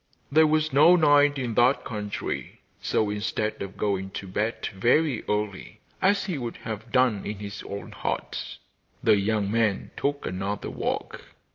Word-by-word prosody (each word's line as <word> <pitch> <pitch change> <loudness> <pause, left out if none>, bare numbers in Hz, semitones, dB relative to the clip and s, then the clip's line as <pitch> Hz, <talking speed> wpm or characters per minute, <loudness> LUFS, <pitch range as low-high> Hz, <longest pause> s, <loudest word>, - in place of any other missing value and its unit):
There 155 +2 +6
was 155 -1 +1
no 155 +6 +7
night 145 -3 +5
in 125 -4 -2
that 125 +4 +3
country, 105 -3 -4 0.2
so, 105 -2 +1
instead 110 +1 -2
of 100 -1 -6
going 95 -2 -1
to - - -6
bed 105 +5 -2
very 120 +6 +2
early, 105 -2 -3 0.2
as 200 +1 +3
he 180 -7 -3
would 120 -2 -5
have 110 +1 -7
done 125 -5 +3
in 105 0 -4
his 100 0 -7
own 100 - -7
hut, - - -4 0.5
the - - +6
young 100 0 0
man 110 -3 +1
took 140 0 -2
another 95 +3 -3
walk. - - -3
110 Hz, 155 wpm, -26 LUFS, 105-145 Hz, 0.5 s, no